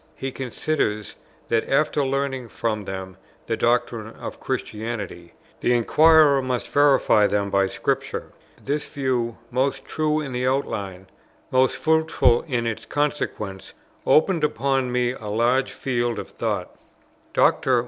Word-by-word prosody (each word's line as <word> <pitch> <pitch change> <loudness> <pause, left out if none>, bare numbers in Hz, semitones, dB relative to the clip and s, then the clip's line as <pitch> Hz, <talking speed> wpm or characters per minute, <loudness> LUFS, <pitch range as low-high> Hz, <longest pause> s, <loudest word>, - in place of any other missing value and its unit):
He 135 - -4
considers, 125 -5 -2 0.3
that, 115 -1 +1
after 150 +1 +2
learning 135 -2 -2
from 110 -3 -2
them 95 -1 -6 0.3
the - - -1
doctrines - - 0
of - - -7
Christianity, 105 -6 -5 0.3
the 120 - +2
inquirer 150 +3 +5
must 130 -2 -2
verify 140 -7 +4
them 100 -1 -1
by 100 0 +3
Scripture. - - -2 0.3
This 145 +2 -1
view, 125 -4 -1
most 135 +2 0
true 155 0 0
in 140 -4 -5
its 125 +1 0
outline, 100 -8 -2 0.5
most 130 0 +3
fruitful 160 -6 +3
in 120 -5 -1
its 115 -1 -4
consequences, 140 -10 -3 0.3
opened 165 +1 +3
upon 135 -3 +1
me 125 0 +1
a 115 -4 -8
large 120 +5 +1
field 120 -3 -1
of 100 - -6
thought. - - -3 0.6
Dr. 130 -2 +3
125 Hz, 130 wpm, -23 LUFS, 110-140 Hz, 0.6 s, inquirer